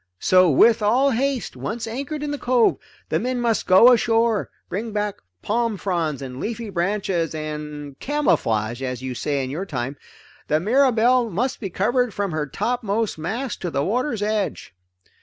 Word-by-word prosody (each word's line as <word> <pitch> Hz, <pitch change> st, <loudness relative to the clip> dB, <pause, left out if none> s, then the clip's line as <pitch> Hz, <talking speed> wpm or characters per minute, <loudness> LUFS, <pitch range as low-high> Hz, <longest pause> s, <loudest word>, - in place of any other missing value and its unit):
So 185 Hz, -, +4 dB
with 225 Hz, -, +5 dB
all 255 Hz, +7 st, +3 dB
haste, 265 Hz, +1 st, -1 dB
once 225 Hz, +2 st, -4 dB
anchored 280 Hz, +6 st, -4 dB
in 295 Hz, -, -2 dB
the 290 Hz, -, -4 dB
cove, 245 Hz, -2 st, +3 dB, 0.3 s
the -, -, +1 dB
men 250 Hz, 0 st, -2 dB
must 235 Hz, -2 st, 0 dB
go 210 Hz, +7 st, +8 dB
ashore, 230 Hz, -2 st, +2 dB, 0.2 s
bring 215 Hz, +3 st, -4 dB
back 210 Hz, -1 st, -2 dB, 0.3 s
palm 230 Hz, -1 st, 0 dB
fronds 165 Hz, -8 st, -2 dB
and 130 Hz, -1 st, -7 dB
leafy 225 Hz, +2 st, -4 dB
branches 175 Hz, -2 st, -1 dB
and 150 Hz, -2 st, -6 dB
camouflage 120 Hz, -, 0 dB
as 125 Hz, -1 st, -4 dB
you 130 Hz, -1 st, -3 dB
say 140 Hz, +2 st, -1 dB
in 130 Hz, -, -4 dB
your 180 Hz, +7 st, -4 dB
time 135 Hz, -2 st, -4 dB, 0.5 s
the 155 Hz, -, +2 dB
Mirabelle 245 Hz, -, +3 dB, 0.8 s
from 200 Hz, -3 st, -3 dB
her 155 Hz, -1 st, -2 dB
topmost 225 Hz, -, -1 dB
mast 230 Hz, +11 st, -4 dB
to 180 Hz, -, -2 dB
the 140 Hz, -2 st, -1 dB
water's 240 Hz, 0 st, -1 dB
edge. 210 Hz, -, -2 dB
210 Hz, 155 wpm, -22 LUFS, 155-235 Hz, 0.8 s, go